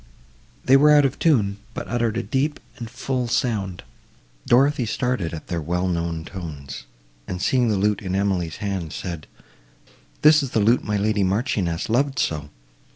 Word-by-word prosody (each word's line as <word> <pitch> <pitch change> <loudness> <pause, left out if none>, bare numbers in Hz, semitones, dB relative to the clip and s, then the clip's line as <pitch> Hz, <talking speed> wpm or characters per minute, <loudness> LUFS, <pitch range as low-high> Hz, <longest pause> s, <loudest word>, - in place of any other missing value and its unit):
They 130 - +6
were 150 +2 +5
out 145 -1 +6
of 135 - -2
tune, 105 -11 +2 0.2
but - - -5
uttered 120 -2 -1
a 120 - -1
deep 145 +5 -1 0.2
and 115 -3 -7
full 125 +1 -2
sound. 105 -7 -1 0.7
Dorothée 135 0 +4
started 125 -8 -1
at 80 - -7
their 85 -3 -3
well 90 +4 -1
known 85 -2 -2
tones, 70 -9 -8 0.4
and, 90 - -4
seeing 125 +5 +2
the 105 - +1
lute 105 +1 +1
in 95 -2 -3
Emily's 95 -5 0
hand, 95 -6 -4
said, 85 -5 -6 1.0
"This 150 0 +7
is 135 - -3
the - - +4
lute 115 +4 +3
my 105 0 -1
lady 105 0 +1
Marchioness 95 -4 -1
loved 135 +4 +1
so! 75 -7 -1
105 Hz, 165 wpm, -23 LUFS, 90-125 Hz, 1.0 s, This